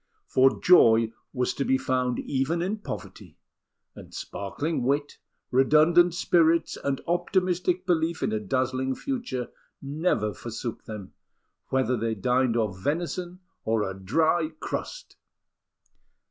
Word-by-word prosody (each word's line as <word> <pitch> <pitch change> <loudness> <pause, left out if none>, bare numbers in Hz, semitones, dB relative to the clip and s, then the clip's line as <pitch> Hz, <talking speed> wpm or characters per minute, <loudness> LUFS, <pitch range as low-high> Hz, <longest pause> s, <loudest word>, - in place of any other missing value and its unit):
For 130 +1 +3
joy 115 -10 +5 0.2
was 125 -2 -1
to 140 - -2
be 130 -1 +2
found 125 -2 0
even 145 +6 -1
in 200 +4 -2
poverty; - - -8 0.6
and - - -13
sparkling 145 +12 -3
wit, 145 +3 -1 0.3
redundant 155 +6 +5
spirits, 170 -1 +2
and 140 -1 -2
optimistic 180 +1 0
belief 170 -2 0
in - - 0
a 110 - 0
dazzling 130 +4 -1
future 240 - -4 0.3
never 140 - -1
forsook 115 +3 -6
them, 105 -3 -8 0.5
whether 130 -1 +1
they 115 -1 -1
dined 125 +3 +1
off 105 -5 -1
venison 175 - -3 0.2
or 110 -2 0
a 95 - -4
dry 155 - +1
crust! - - -6
135 Hz, 120 wpm, -26 LUFS, 120-170 Hz, 0.6 s, joy